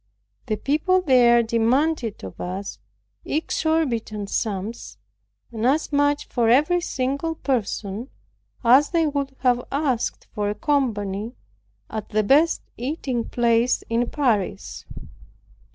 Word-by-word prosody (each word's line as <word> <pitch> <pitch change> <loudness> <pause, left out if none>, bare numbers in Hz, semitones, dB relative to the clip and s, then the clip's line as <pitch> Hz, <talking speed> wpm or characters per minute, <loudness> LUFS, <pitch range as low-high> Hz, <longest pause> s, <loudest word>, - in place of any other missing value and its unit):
The 215 - 0
people 310 - +1
there 240 -5 +5
demanded 235 - 0
of 95 - -8
us 190 +3 -5 0.4
exorbitant 270 -10 -1
sums, 215 +1 -3 0.5
and 225 -1 -5
as 285 +6 +1
much 290 0 +2
for 235 -3 +1
every 300 +9 +4
single 280 +2 -2
person 225 -3 -2 0.5
as 260 +5 +6
they 335 -2 +2
would 280 -2 -2
have 245 -1 +2
asked 275 -4 -1
for 205 -2 -1
a 205 - -2
company 220 -5 -1 0.5
at 215 -1 -6
the 215 0 +1
best 300 +10 +3
eating 255 -2 -3
place 235 0 +2
in 235 +1 +1
Paris. 215 -9 -1
245 Hz, 115 wpm, -23 LUFS, 220-290 Hz, 0.5 s, as